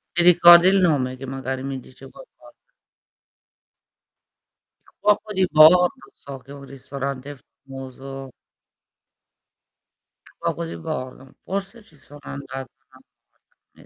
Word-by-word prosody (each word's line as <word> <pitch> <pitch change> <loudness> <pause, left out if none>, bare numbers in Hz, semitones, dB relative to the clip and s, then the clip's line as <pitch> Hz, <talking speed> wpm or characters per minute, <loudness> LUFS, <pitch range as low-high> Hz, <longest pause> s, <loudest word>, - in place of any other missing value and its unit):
Ti 175 - +2
ricordi 175 0 +8
il 195 +1 +4
nome? 140 -8 +1
Che 135 - -8
magari 130 0 -5
mi 135 -1 -5
dice 130 +1 -15
qualcosa? - - -17 2.3
Il - - -25
Cuoco 210 +1 +1
di 190 -1 +2
Bordo 155 -1 +5
so 140 -1 -11
che 130 +2 -17
è - - -8
un 140 - -11
ristorante 140 0 -7 0.3
famoso 135 0 -9 2.0
Il - - -23
Cuoco 85 - -3
di 85 +1 -7
Bordo, 130 +9 -7
forse 200 +4 -5
ci 165 - -24
sono 145 0 -16
andata 135 -2 -8
una - - -48
volta - - -24 0.6
non - - -19
140 Hz, 130 wpm, -22 LUFS, 135-175 Hz, 2.3 s, ricordi